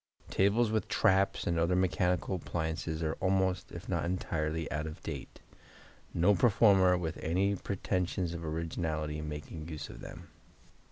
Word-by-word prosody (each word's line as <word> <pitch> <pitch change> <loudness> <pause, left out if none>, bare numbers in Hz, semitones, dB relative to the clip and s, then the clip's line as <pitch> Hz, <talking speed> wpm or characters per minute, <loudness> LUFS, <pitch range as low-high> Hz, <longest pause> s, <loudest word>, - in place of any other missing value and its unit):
Tables 105 +4 +3
with 110 -1 0
traps 100 -2 +2
and 85 -1 +1
other 85 +2 +2
mechanical 90 0 +1
appliances 80 -1 -3
are 80 0 0
almost, 95 -1 +1
if - - -8
not - - 0
entirely, 80 -2 -1
out 75 +1 -2
of 75 - -7
date, - - -7 0.7
no 90 +5 +4
performer 95 -3 +5
with 80 -3 -3
any 95 +5 +1
pretentions 90 -2 -2
of 85 -1 -5
originality 80 -1 -2
making 75 +1 -6
use 75 -2 -6
of - - -10
them. - - -10
85 Hz, 145 wpm, -32 LUFS, 80-95 Hz, 0.7 s, performer